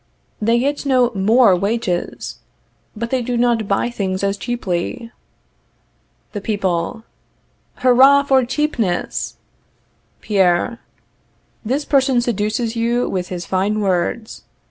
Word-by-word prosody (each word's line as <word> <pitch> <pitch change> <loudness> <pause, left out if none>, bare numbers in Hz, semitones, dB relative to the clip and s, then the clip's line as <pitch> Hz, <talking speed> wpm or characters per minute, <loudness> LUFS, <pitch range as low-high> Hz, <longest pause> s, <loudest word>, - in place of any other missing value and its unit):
They 230 +2 +3
get 280 +4 -1
no 255 -3 +3
more 210 +1 +4
wages, 195 -2 -2 0.6
but 230 +2 -4
they 260 -1 +1
do 245 0 -2
not 235 -3 +1
buy 200 +5 0
things 190 -4 -3
as 200 0 +1
cheaply. 230 0 -3 1.2
The 205 - -5
People. 195 -1 -2 0.7
Hurrah 265 +3 +5
for 265 -2 +3
CHEAPNESS! 245 - -2 0.8
Pierre. 195 +2 +1 0.8
This 270 +6 -1
person 265 -3 +3
seduces 225 0 -1
you 235 +1 0
with 180 -1 -3
his 180 -1 -5
fine 200 +3 0
words. 195 +3 -1
230 Hz, 110 wpm, -19 LUFS, 195-245 Hz, 1.2 s, Hurrah